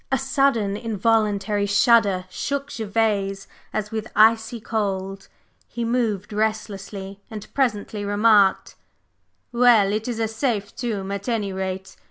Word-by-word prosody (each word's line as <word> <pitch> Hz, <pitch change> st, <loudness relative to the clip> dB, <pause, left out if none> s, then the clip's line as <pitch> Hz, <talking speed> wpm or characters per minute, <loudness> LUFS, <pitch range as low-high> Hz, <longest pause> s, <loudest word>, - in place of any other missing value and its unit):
A 265 Hz, -, +3 dB
sudden 270 Hz, -7 st, +1 dB
involuntary 210 Hz, -2 st, 0 dB
shudder 205 Hz, -3 st, +3 dB
shook 280 Hz, +6 st, -3 dB
Gervase 205 Hz, -3 st, -1 dB, 0.3 s
as 210 Hz, -1 st, -3 dB
with 220 Hz, -1 st, -4 dB
icy 225 Hz, +2 st, +4 dB
cold; 195 Hz, -3 st, -3 dB, 0.4 s
he 235 Hz, -1 st, -4 dB
moved 225 Hz, -4 st, -1 dB
restlessly, 205 Hz, -2 st, -3 dB
and 215 Hz, -2 st, -8 dB
presently 215 Hz, -5 st, -1 dB
remarked: 205 Hz, -1 st, +3 dB, 0.8 s
"Well, 235 Hz, -5 st, +4 dB
it 215 Hz, +2 st, -2 dB
is 235 Hz, -2 st, -3 dB
a 225 Hz, -, +1 dB
safe 220 Hz, -3 st, -2 dB
tomb, 210 Hz, -7 st, -3 dB
at 200 Hz, +4 st, -4 dB
any 210 Hz, -4 st, -1 dB
rate! 190 Hz, 0 st, -5 dB
215 Hz, 125 wpm, -23 LUFS, 200-230 Hz, 0.8 s, icy